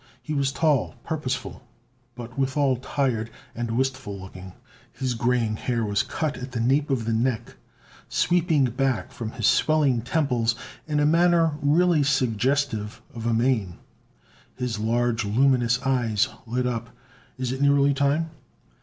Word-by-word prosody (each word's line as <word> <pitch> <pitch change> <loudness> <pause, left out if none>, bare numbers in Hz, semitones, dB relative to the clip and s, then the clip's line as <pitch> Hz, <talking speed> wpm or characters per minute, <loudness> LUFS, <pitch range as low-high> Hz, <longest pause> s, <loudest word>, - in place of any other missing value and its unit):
He 155 - -4
was 140 -2 +1
tall, 145 -5 +1
purposeful, 135 -5 -3 0.5
but 120 0 -9
withal 135 -1 +1
tired 125 -3 -1 0.2
and 120 -1 -3
wistful 130 -6 -2
looking. 95 0 -10 0.4
His 130 -2 -2
graying 115 -2 0
hair 120 -1 -1
was 100 -1 +1
cut 155 -3 -3
at 125 0 -7
the 120 - -2
nape 135 +5 +2
of 125 -5 0
his 115 - 0
neck, 115 0 -1 0.5
sweeping 170 -4 +2
back 130 -1 -1
from 115 -1 -6
his 115 -4 -2
swelling 145 -6 +3
temples 120 -3 0 0.3
in 150 -1 0
a 145 - +3
manner 165 +1 +4
really 160 +2 +3
suggestive 130 -4 0
of 115 -1 -4
a 115 - +2
mane. 110 -7 +1 0.8
His 125 -3 -3
large, 115 +1 +1
luminous 120 +2 +2
eyes 120 -6 +1 0.2
lit 125 +2 -1
up. 115 -2 -2 0.5
"Is 130 -1 -2
it 130 +1 -4
nearly 140 0 +4
time?" 140 +4 +1
130 Hz, 145 wpm, -25 LUFS, 115-140 Hz, 0.8 s, manner